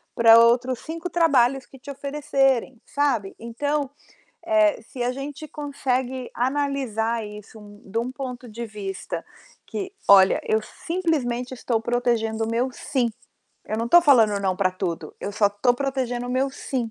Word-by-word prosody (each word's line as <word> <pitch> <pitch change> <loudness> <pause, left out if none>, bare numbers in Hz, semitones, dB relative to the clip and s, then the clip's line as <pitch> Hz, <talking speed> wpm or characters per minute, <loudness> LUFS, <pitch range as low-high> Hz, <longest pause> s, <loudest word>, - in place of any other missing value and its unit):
pra 230 0 +8
outros 240 +1 +3
5 330 +2 -6
trabalhos 270 -6 +3
que 270 - -15
te 280 - -8
oferecerem, 270 -3 0
sabe. 260 -9 0
Então, 285 +5 -2 0.6
eh, 320 -5 +3
se 245 +2 -7
a 245 - +1
gente 290 +3 -7
consegue 260 -3 -3
analisar 245 -4 -1
isso 210 +1 -11 0.3
de 210 +4 -3
um 250 +2 -2
ponto 250 -3 -7
de 230 +2 -6
vista 200 -3 -6 0.4
que: 385 -2 -5 0.2
"Olha, 195 -1 +7
eu 220 0 +2
simplesmente 260 -7 -2
estou 235 -2 -1
protegendo 225 -2 0
o - - -4
meu 245 +3 0
'sim', 250 -2 -1 0.6
eu 215 - -2
não 230 +1 -2
tô 345 - +8
falando 225 -10 +4
'não' 190 -2 0
pra 185 -2 +2
tudo, 180 -2 -4
eu 205 - -4
só 205 -1 +3
tô 240 +5 +2
protegendo 250 -2 -2
o - - -4
meu 265 +2 +1
'sim'". 250 -4 -4
245 Hz, 155 wpm, -24 LUFS, 225-275 Hz, 0.6 s, pra